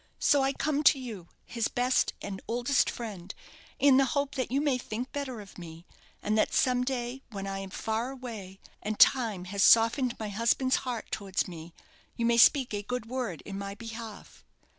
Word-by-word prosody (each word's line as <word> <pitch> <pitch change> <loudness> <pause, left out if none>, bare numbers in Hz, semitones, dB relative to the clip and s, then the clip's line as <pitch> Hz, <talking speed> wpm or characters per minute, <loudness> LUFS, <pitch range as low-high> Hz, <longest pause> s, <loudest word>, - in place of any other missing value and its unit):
So 285 - +3
I 270 0 +2
come 295 +1 -1
to - - +7
you, 220 -9 -7 0.2
his 230 -2 -1
best 250 +1 +1
and 195 -1 -5
oldest 245 +4 +1
friend, 200 -6 -6 0.5
in 275 -2 +5
the 275 - +5
hope 280 0 0
that 260 -3 -2
you 265 +3 +1
may 285 -4 +1
think 240 +2 -5
better 270 -5 -4
of 195 -2 -13
me; 165 0 -10 0.4
and 210 - 0
that - - +1
some 250 -1 +3
day, 250 0 -3
when 200 -4 -6
I 195 0 -4
am 195 0 -6
far 220 +5 -2
away, 225 -8 -8 0.2
and 210 +1 -3
time 220 -8 +4
has 200 - 0
softened 235 +4 +5
my 215 -1 -4
husband's 230 +5 +2
heart 245 -4 -5
towards 195 -3 -2
me, 170 -1 -10 0.4
you 235 - -1
may 235 0 +3
speak 260 -1 +5
a 205 - -2
good 250 +3 -4
word 235 -8 -4
in 195 -1 -6
my 200 0 -5
behalf.' 225 -1 -9
230 Hz, 190 wpm, -29 LUFS, 200-255 Hz, 0.5 s, to